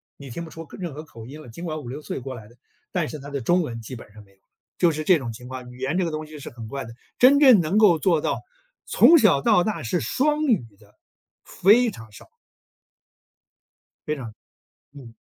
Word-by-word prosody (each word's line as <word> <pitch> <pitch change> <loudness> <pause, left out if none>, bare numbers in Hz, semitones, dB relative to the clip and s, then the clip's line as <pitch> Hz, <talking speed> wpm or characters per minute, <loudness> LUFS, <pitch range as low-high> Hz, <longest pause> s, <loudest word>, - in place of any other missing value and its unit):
你 140 -1 -11
听 170 +8 -6
不 - - -11
出 165 +1 -9
口 - - -13
任 175 -6 -5
何 150 +3 -8
口 115 -8 -12
音 145 +6 -10
了， 135 - -13
尽 170 +10 -8
管 155 -2 -4
5-6 135 +1 -7
岁 - - -5
过 130 0 -7
来 110 -3 -11
的， 120 - -20 0.4
但 175 -4 -1
是 155 - -7
他 140 +1 -9
的 140 -2 -4
中 175 +9 +2
文 115 -7 -5
基 120 +3 -8
本 110 -3 -12
上 105 -1 -13
没 100 - -24
有， 95 - -29 0.4
就 175 -2 +3
是 155 0 -4
这 180 +2 +5
种 125 -6 -5
情 125 +2 -11
况。 125 -1 -8
语 125 - -14
言 135 +7 -2
这 185 - +1
个 165 - -3
东 155 0 -4
西 155 0 -11
是 - - -8
很 115 -2 -10
怪 135 +2 -5
的， 115 - -10 0.3
真 270 +3 +7
正 260 -8 +7
能 170 +6 0
够 195 -7 +5
做 165 -4 +2
到 - - -2 0.4
从 335 - +6
小 185 - +4
到 175 - +4
大 210 - -3
是 165 +10 -1
双 300 +3 0
语 220 - +2
的， 105 -1 -23 0.5
非 225 +5 +3
常 110 - -12
少。 - - -15 1.8
非 150 - 0
常， 120 -6 -8 0.6
嗯。 130 -5 -13
150 Hz, 245 characters per minute, -23 LUFS, 120-175 Hz, 1.8 s, 真